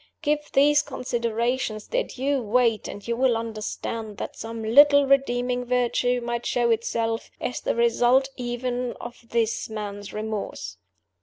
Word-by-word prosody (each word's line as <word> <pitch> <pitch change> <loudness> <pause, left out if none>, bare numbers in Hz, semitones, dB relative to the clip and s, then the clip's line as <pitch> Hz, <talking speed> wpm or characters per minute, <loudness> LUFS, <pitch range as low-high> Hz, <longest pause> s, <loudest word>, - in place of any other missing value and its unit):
Give 300 -1 +2
these 290 +2 +5
considerations 235 -3 -2
their - - +1
due 270 +1 -1
weight; 230 -1 +2
and 205 - -8
you 235 - 0
will 250 -1 +2
understand 220 -1 -5
that - - -5
some 225 0 -6
little 285 +5 +6
redeeming 250 -2 +1
virtue 245 0 +1
might 235 0 -3
show 240 -1 +2
itself, 225 0 -1
as 250 - -3
the - - -1
result 240 +3 +3
even 245 0 -3
of 240 0 -10
this 230 -1 0
man's 205 -2 -6
remorse. 210 - -5
240 Hz, 140 wpm, -25 LUFS, 225-250 Hz, -, little